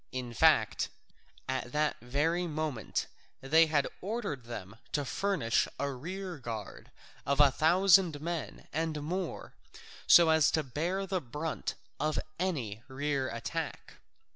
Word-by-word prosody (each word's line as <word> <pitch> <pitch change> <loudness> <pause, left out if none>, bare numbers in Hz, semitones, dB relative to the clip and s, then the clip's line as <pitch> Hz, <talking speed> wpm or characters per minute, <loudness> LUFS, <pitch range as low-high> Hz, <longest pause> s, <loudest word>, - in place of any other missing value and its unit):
In 125 -2 -4
fact, 110 - +3 0.6
at 130 -2 -2
that 150 0 +1
very 155 +8 0
moment 155 -7 -2 0.3
they 160 +4 +5
had 145 -3 +2
ordered 200 - -3
them 110 -3 -7 0.2
to 145 -1 0
furnish 160 - +1
a 140 0 0
rear 175 +5 -6
guard 115 -5 -7 0.3
of 140 +1 0
a 145 -2 +7
thousand 175 +1 +4
men 165 +1 -5
and 155 -1 -1
more, 180 +3 -4 0.5
so 170 -1 +8
as 160 -3 +5
to 155 - +2
bear 170 +9 -2
the 190 -1 -1
brunt 150 +6 -4 0.2
of 155 +1 0 0.2
any 130 - -2
rear 135 0 -1
attack. 115 0 -5
150 Hz, 130 wpm, -31 LUFS, 130-170 Hz, 0.6 s, so